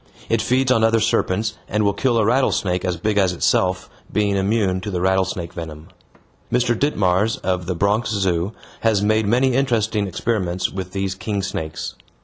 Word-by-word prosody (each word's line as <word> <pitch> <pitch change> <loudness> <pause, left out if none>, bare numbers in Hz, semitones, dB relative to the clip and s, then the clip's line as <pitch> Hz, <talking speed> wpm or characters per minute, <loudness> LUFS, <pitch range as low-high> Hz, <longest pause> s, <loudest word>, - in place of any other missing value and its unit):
It 115 -1 +2
feeds 130 +2 +2
on 115 -3 +3
other 115 0 +4
serpents, 105 -1 0
and 105 0 +1
will 100 -1 +2
kill 120 +3 +1
a 110 - +3
rattlesnake 105 -7 +1
as 90 -2 -1
big 105 +3 0
as 95 -2 +2
itself, 95 +1 +1 0.2
being 105 -1 +1
immune 95 -1 +1
to 105 - -5
the 90 -3 -2
rattlesnake 95 -2 0
venom. 80 -2 -8 0.6
Mr. 120 0 +2
Ditmars, 105 -5 +1
of 90 -2 -1
the 90 - -1
Bronx 105 +5 +1
Zoo, 95 -3 0 0.3
has 110 -3 +2
made 110 0 +2
many 125 +4 +3
interesting 110 -6 +1
experiments 95 -2 -1
with 95 -1 -6
these 95 -1 -1
king 100 0 -3
snakes. 80 -5 -4
100 Hz, 170 wpm, -21 LUFS, 95-110 Hz, 0.6 s, other